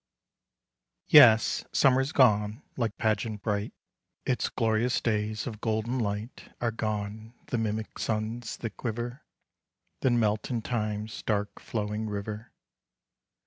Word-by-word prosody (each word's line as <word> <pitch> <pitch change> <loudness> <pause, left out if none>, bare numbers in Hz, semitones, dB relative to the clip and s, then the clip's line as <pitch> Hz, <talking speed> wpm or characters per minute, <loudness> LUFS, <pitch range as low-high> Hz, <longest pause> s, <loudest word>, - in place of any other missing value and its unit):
Yes, 110 -1 +7
Summer's 135 +1 +3
gone 105 -3 +3
like 115 -4 -2
pageant 110 -2 -1
bright; 105 -1 -1 0.5
Its 125 -4 0
glorious 115 +1 +1
days 110 -1 -1
of 110 -4 -6
golden 110 +3 -1
light 105 +2 -4
Are 120 -1 0
gone 110 +1 -4
the 120 - 0
mimic 110 0 -3
suns 110 +1 -2
that 115 - -6
quiver, 120 +3 -4 0.8
Then 120 -2 +2
melt 105 -1 0
in 120 -4 -2
Time's 105 -2 -3
dark 105 -2 -1
flowing 105 0 -3
river. 105 +2 -5
110 Hz, 115 wpm, -28 LUFS, 105-120 Hz, 0.8 s, Yes